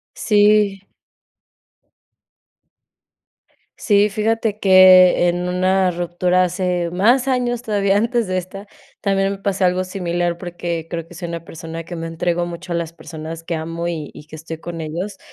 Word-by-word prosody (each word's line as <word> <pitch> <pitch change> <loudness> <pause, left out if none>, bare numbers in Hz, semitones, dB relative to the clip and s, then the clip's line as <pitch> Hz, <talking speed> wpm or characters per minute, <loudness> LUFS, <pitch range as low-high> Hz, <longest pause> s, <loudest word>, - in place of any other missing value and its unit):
Sí. 205 -2 +3 2.9
Sí, 205 -1 +3
fíjate 215 0 -1
que 185 -2 +7
en 175 +1 -1
una 185 +1 +2
ruptura 175 +1 +1
hace 180 -1 -1
más 235 +8 +3
años 245 -2 0
todavía 200 -3 +1
antes 230 0 0
de 185 - -1
esta, 195 +3 -8 0.3
también 195 -1 +1
me 195 - -6
pasó 195 -1 -1
algo 180 +1 +2
similar 175 -2 -2
porque 175 -2 -5
creo 165 -1 -5
que - - -14
soy 175 +1 -6
una 170 -1 -6
persona 165 0 -8
que 175 +1 -8
me 165 0 -5
entrego 175 +1 -1
mucho 175 +1 -8
a - - 0
las 170 -1 -3
personas 165 0 -8
que 165 0 -3
amo 165 +2 -4
y 160 -4 -5
y 150 - -12
que 155 - -9
estoy 160 +1 -8
con 170 0 -7
ellos, 170 +6 -5
180 Hz, 155 wpm, -19 LUFS, 170-200 Hz, 2.9 s, que